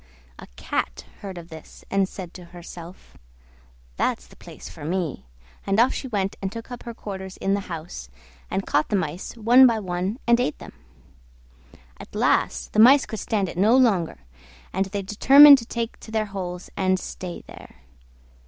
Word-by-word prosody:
A - - -11
Cat - - -3
heard 195 -3 -8
of 170 0 -10
this, 160 -1 -13
and 195 -1 +1
said 180 -3 -9
to 180 - -11
herself, 175 0 -12 0.8
"That's - - -1
the - - -18
place - - -12
for - - -11
me," 165 - -3 0.4
and 195 +2 0
off 245 +3 +4
she 265 - -5
went 200 -5 -2
and 195 -1 -3
took 230 +2 -9
up 245 - -7
her 235 -1 -7
quarters 190 -3 -7
in 195 - 0
the 200 - +1
house, 160 - -7 0.4
and 195 - -2
caught 150 +1 +1
the - - +1
Mice 170 -2 -3
one 245 +4 +7
by 230 -2 +1
one 185 +1 -3
and 235 0 +4
ate 200 -11 -1
them. - - -12 1.3
At - - -12
last - - 0
the 215 - +1
Mice 265 +5 +7
could 220 - -6
stand 205 -3 -1
it 175 - -6
no 220 +6 +5
longer, 200 - +2 0.6
and 195 - 0
they 200 0 -4
determined 275 +8 +8
to 230 - -10
take 230 -1 -4
to - - -13
their 220 -1 -1
holes 180 -2 -6
and 185 -1 +1
stay 180 -1 -7
there. - - -14
195 Hz, 180 wpm, -24 LUFS, 180-225 Hz, 1.3 s, determined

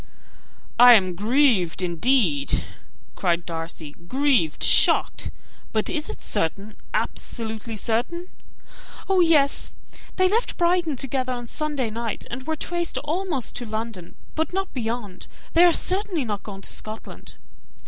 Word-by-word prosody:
"I 245 0 +10
am 185 -4 +2
grieved, 210 - +2
indeed," 170 - +1 0.5
cried 175 -1 0
Darcy: 165 -2 -5 0.2
"grieved 260 - +1
shocked. - - +4 0.4
But 215 -1 +1
is 310 -3 -2
it - - -6
certain, 195 +6 -2 0.2
absolutely 225 0 -3
certain?" 245 - -2 0.8
"Oh, 385 -1 +3
yes! 310 -5 +3 0.5
They 370 0 +4
left 445 +6 0
Brighton 345 -3 +2
together 255 0 -2
on 240 -1 -5
Sunday 285 -3 -2
night, 230 -1 -4
and 260 +1 -6
were 320 - 0
traced 345 +2 -2
almost 315 -3 -2
to 245 - -5
London, 215 -5 -5 0.2
but 320 +1 -2
not 385 0 -2
beyond: 225 -6 -4 0.3
they 335 - +6
are 350 - +6
certainly 365 -4 0
not 205 -3 -3
gone 195 -2 -9
to - - -3
Scotland." 215 +1 -7
245 Hz, 130 wpm, -24 LUFS, 205-315 Hz, 0.8 s, I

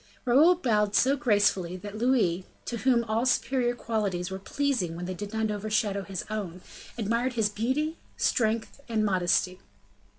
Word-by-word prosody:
Raoul 295 +9 +6
bowed 210 - +1
so 270 +2 +4
gracefully, 205 -9 +1
that 205 +2 -8
Louis, 215 -7 +2 0.2
to 235 - -3
whom 235 +1 +2
all 225 +1 0
superior 250 -1 +1
qualities 200 -6 -2
were 190 - -4
pleasing 225 - -1
when 175 +1 -5
they 185 - -3
did 205 +3 -6
not 220 -1 -1
overshadow 210 -1 -1
his 190 -2 -5
own, 195 -5 -5 0.4
admired 235 +3 0
his 220 -3 +1
beauty, 260 +10 -1 0.2
strength, 225 +3 0
and 220 -2 +1
modesty. 185 -1 +1
215 Hz, 155 wpm, -27 LUFS, 195-245 Hz, 0.4 s, Raoul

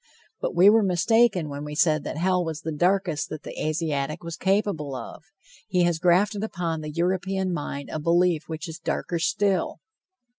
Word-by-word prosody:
But - - -3
we 180 +3 +6
were 220 +2 +7
mistaken 195 -1 +3
when 145 0 -6
we 150 0 -6
said 155 -1 +3
that - - -4
hell 180 +1 +2
was 160 -2 -4
the 160 - -4
darkest 175 0 0
that 155 -1 -7
the - - -6
Asiatic 155 0 -2
was 170 -1 -5
capable 190 -8 0
of. 120 -3 -8 0.4
He 180 -4 +2
has 175 -2 +1
grafted 195 +4 +2
upon 170 -6 -3
the 155 - -5
European 185 +3 -1
mind 145 -3 -5
a 155 - -3
belief 170 0 +2
which 160 +1 -5
is 160 0 -8
darker 170 - -2
still. 195 +3 0
170 Hz, 180 wpm, -25 LUFS, 155-190 Hz, 0.4 s, were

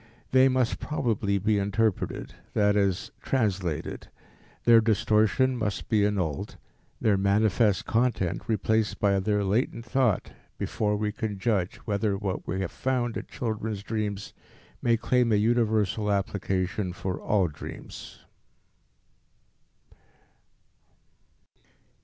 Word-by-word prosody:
They 130 0 +6
must 130 -2 +1
probably 110 -8 0
be 105 +1 +1
interpreted, 100 +1 -1 0.2
that 105 -1 +3
is, 100 -3 0
translated; 95 - -2 0.5
their 115 -1 +7
distortion 110 +3 +2
must 105 -5 -3
be 110 -3 +3
annulled; 90 -9 -2 0.4
their 105 -3 +3
manifest 100 +1 +2
content 115 -7 0
replaced 110 -1 +1
by 100 -1 +3
their 105 +1 +1
latent 115 +3 0
thought 125 -4 +1 0.3
before 105 -1 -1
we 105 0 -1
can 105 -2 -4
judge 95 -3 0
whether 100 -1 0
what 95 -2 -4
we 95 +2 -2
have 95 - -3
found 125 -3 -1
in - - -5
children's 110 -3 -3
dreams 105 -2 -3 0.5
may 115 -1 +3
claim 120 +1 +2
a - - +4
universal 110 -2 +1
application 95 -1 -1
for 90 +1 -4
all 100 -4 +2
dreams. 75 -2 -10
105 Hz, 110 wpm, -27 LUFS, 100-115 Hz, 0.5 s, their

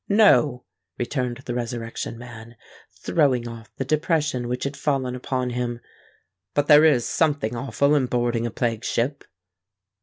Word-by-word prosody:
"No," 175 - +4 0.3
returned 125 0 -3
the 120 - -3
Resurrection 115 -1 -4
Man, 115 -1 -11 0.5
throwing 130 -7 +2
off 115 -1 -10
the 135 - -3
depression 150 -3 0
which 125 +1 -3
had 140 +1 -3
fallen 135 -4 -1
upon 125 0 -2
him. 120 -1 -3 0.8
"But 145 - +2
there 150 +1 +7
is 130 -7 +4
something 145 -8 0
awful 140 +4 +1
in 140 -4 +2
boarding 120 -1 0
a - - -3
plague 115 +1 -2
ship." 135 +5 -1
125 Hz, 145 wpm, -24 LUFS, 120-145 Hz, 0.8 s, there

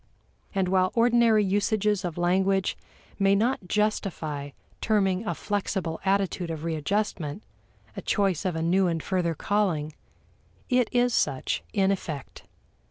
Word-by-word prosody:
And 190 -2 +1
while 185 0 +2
ordinary 230 -2 +4
usages 205 0 +1
of 175 -2 -4
language 190 +2 +1 0.4
may 195 0 +4
not 220 -2 0
justify 175 -9 -1 0.3
terming 195 -3 +1
a - - -1
flexible 190 -5 -2
attitude 195 -2 0
of 160 -1 -5
readjustment 165 +1 -2 0.5
a - - -5
choice 195 -5 +1
of 185 -4 -1
a 160 - -1
new 185 +3 +3
and 165 -2 -1
further 175 -3 0
calling, 170 -6 0 0.8
it 250 -2 +2
is 245 0 +2
such 135 -9 0
in 195 -2 +2
effect. 155 -7 -5
190 Hz, 130 wpm, -26 LUFS, 170-210 Hz, 0.8 s, ordinary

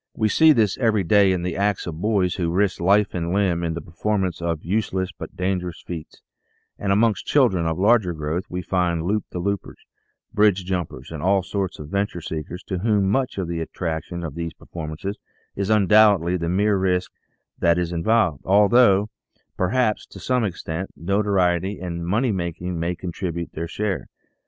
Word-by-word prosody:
We 110 -2 +1
see 160 +7 +6
this 110 -9 +2
every 110 -5 +2
day 100 +2 +4
in 90 -2 -1
the 90 -1 -2
acts 100 0 0
of 80 -1 -6
boys 100 -4 +1
who 85 -3 -1
risk 95 +3 +1
life 100 +4 +3
and 85 -1 -2
limb 90 -3 +1
in 80 -1 -1
the 85 - -4
performance 95 -1 -2
of 85 -2 -2
useless 95 -1 -1
but - - -9
dangerous 90 -2 -2
feats, 80 -3 -8 0.6
and 100 - -1
amongst 110 +1 +2
children 95 - +3
of 80 -1 -1
larger 105 -2 +3
growth 80 +4 -3
we 90 0 -4
find 85 -3 0
loop 105 +3 0
the - - -6
loopers, 100 +2 -3 0.6
bridge 100 -3 +3
jumpers, 85 -8 -4
and 80 -2 -6
all 95 +2 +2
sorts 95 -1 -3
of 75 -1 -9
venture 100 -2 -1
seekers 80 +2 -6
to 95 -3 -4
whom 100 -1 +2
much 130 0 0
of 95 -3 -2
the 85 -1 -3
attraction 85 +1 -4
of 80 -4 -5
these 85 +1 -4
performances 85 +5 -6 0.4
is 100 0 -2
undoubtedly 105 -4 +5
the 85 -2 -2
mere 100 +3 +2
risk 90 -1 0 0.5
that 85 0 +3
is 90 -1 -1
involved, 85 -3 +1
although, 105 +1 +5 0.5
perhaps, 110 +3 0
to - - -12
some 125 -2 0
extent, 90 -2 -4
notoriety 95 +1 +1
and 85 -2 -5
money 115 +7 +1
making 90 -1 -3
may 85 +2 -1
contribute 85 -1 -4
their 85 +1 -4
share. 100 +2 -3
95 Hz, 175 wpm, -23 LUFS, 85-100 Hz, 0.6 s, see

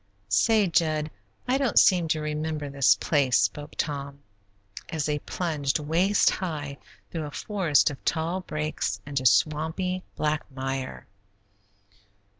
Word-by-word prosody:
"Say, 210 - +4
Jud, 155 -3 +1 0.4
I 260 +2 +2
don't 265 -6 0
seem 180 -4 +5
to 155 -1 0
remember 150 -1 -3
this 140 -2 +4
place," 140 -6 +2
spoke 125 +10 -1
Tom, 140 -2 -3 0.7
as 155 -3 -2
they 150 -1 0
plunged 150 -4 -1
waist 170 +7 +2
high 150 -6 -4 0.3
through 160 -3 -3
a - - -5
forest 175 -5 +1
of 135 - -11
tall 165 +3 -1
brakes 155 -3 -3
into 135 -3 +1
swampy, 160 +7 +1
black 155 0 0
mire. 135 -1 -4
155 Hz, 125 wpm, -26 LUFS, 140-170 Hz, 0.7 s, seem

